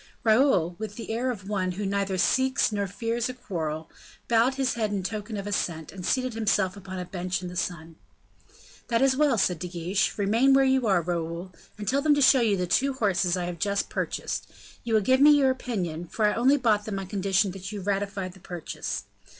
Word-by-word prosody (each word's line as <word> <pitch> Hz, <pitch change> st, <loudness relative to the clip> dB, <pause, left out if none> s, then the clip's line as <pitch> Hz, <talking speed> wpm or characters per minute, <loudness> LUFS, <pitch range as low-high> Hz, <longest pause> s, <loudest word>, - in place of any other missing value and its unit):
Raoul, 220 Hz, -, +3 dB
with 215 Hz, -2 st, -5 dB
the 230 Hz, -, -6 dB
air 240 Hz, +3 st, -1 dB
of 205 Hz, -6 st, -5 dB
one 185 Hz, -3 st, -1 dB
who 200 Hz, +3 st, -4 dB
neither 195 Hz, -1 st, -1 dB
seeks 260 Hz, +7 st, +2 dB
nor 200 Hz, -1 st, -1 dB
fears 230 Hz, +5 st, -2 dB
a 255 Hz, -, -6 dB
quarrel, 160 Hz, -9 st, -4 dB, 0.4 s
bowed 235 Hz, +3 st, +3 dB
his 265 Hz, -1 st, 0 dB
head 220 Hz, -3 st, -1 dB
in 200 Hz, -2 st, -2 dB
token 215 Hz, +2 st, -4 dB
of 200 Hz, -, -5 dB
assent, 170 Hz, -6 st, -2 dB
and 190 Hz, -2 st, -9 dB
seated 255 Hz, +4 st, 0 dB
himself 205 Hz, -4 st, +1 dB
upon 190 Hz, -1 st, -8 dB
a 180 Hz, -, -4 dB
bench 180 Hz, 0 st, -3 dB
in 180 Hz, -, -4 dB
the 180 Hz, -, -9 dB
sun. 165 Hz, -2 st, -4 dB, 0.9 s
"That 230 Hz, +1 st, +2 dB
is 270 Hz, -1 st, +4 dB
well," 285 Hz, -4 st, +3 dB
said 180 Hz, -4 st, +1 dB
De 180 Hz, -, -4 dB
Guiche, 180 Hz, +3 st, -1 dB
"remain 225 Hz, +7 st, +3 dB
where 270 Hz, 0 st, +5 dB
you 265 Hz, -2 st, +2 dB
are, 190 Hz, -4 st, +3 dB
Raoul, 170 Hz, +1 st, -3 dB, 0.3 s
and 210 Hz, -1 st, -7 dB
tell 275 Hz, +2 st, +2 dB
them 300 Hz, 0 st, +4 dB
to -, -, +1 dB
show 260 Hz, 0 st, +6 dB
you 215 Hz, -4 st, +2 dB
the 180 Hz, -, 0 dB
two 270 Hz, +10 st, +1 dB
horses 190 Hz, -7 st, +1 dB
I 180 Hz, -, -2 dB
have 175 Hz, -1 st, -5 dB
just 200 Hz, -1 st, -1 dB
purchased; -, -, -3 dB, 0.4 s
you 230 Hz, -2 st, 0 dB
will 215 Hz, -, +4 dB
give 260 Hz, +6 st, +3 dB
me 295 Hz, 0 st, +8 dB
your 270 Hz, -2 st, +4 dB
opinion, 180 Hz, -10 st, -4 dB
for 215 Hz, +5 st, 0 dB
I 210 Hz, -, +3 dB
only 260 Hz, +5 st, +4 dB
bought 215 Hz, -5 st, +2 dB
them 210 Hz, -2 st, -3 dB
on 195 Hz, -, -4 dB
condition 195 Hz, 0 st, +1 dB
that 190 Hz, +1 st, -7 dB
you 210 Hz, -, -5 dB
ratified 195 Hz, -1 st, -2 dB
the 190 Hz, -, -16 dB
purchase. 175 Hz, -3 st, -5 dB
205 Hz, 220 wpm, -26 LUFS, 180-235 Hz, 0.9 s, me